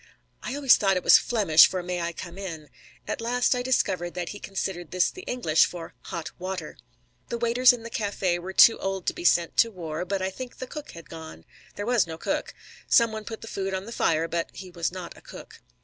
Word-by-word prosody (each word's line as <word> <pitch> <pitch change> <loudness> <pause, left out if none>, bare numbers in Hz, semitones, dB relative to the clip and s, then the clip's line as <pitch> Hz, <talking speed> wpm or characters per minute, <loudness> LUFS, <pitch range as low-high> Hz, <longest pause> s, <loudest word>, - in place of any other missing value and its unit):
I 255 - -4
always 280 -3 +5
thought 195 -2 +2
it 180 - -3
was - - +8
Flemish 195 -10 +5
for 185 -1 -4
"May 180 0 -3
I 170 0 -2
come 175 +2 -9
in?" 160 -6 -7 0.4
At - - -3
last 245 +2 +2
I 250 - -1
discovered 190 -9 0
that 175 -1 -3
he 205 - -7
considered 190 -3 -4
this 185 -1 +1
the 370 - -10
English 195 -11 +3
for 170 -2 -8
"hot 170 -4 -5
water." 185 +1 -5 0.5
The 235 - -2
waiters 240 +2 +5
in 245 -2 -6
the 230 - -8
café 195 -4 -1
were 185 +2 -6
too 225 +4 +7
old 195 -1 -3
to - - 0
be - - -8
sent 170 -1 +2
to 230 - +5
war, 170 -5 -5
but 195 +2 -2
I 190 - -1
think 255 +4 -8
the 255 - -5
cook 300 +3 -9
had 170 -1 -11
gone. 160 -1 -10 0.3
There 205 - -4
was 240 -5 +2
no 160 -1 -6
cook. - - -3 0.3
Some 230 -2 +4
one 220 -1 -6
put 225 -1 -7
the 225 - -9
food 195 -2 -3
on 190 +1 -4
the 230 - -9
fire, 165 -7 +1
but 170 0 -2
he 185 -1 -9
was 170 -1 -2
not 180 -1 -8
a - - -16
cook. - - -12
190 Hz, 235 wpm, -26 LUFS, 175-230 Hz, 0.5 s, was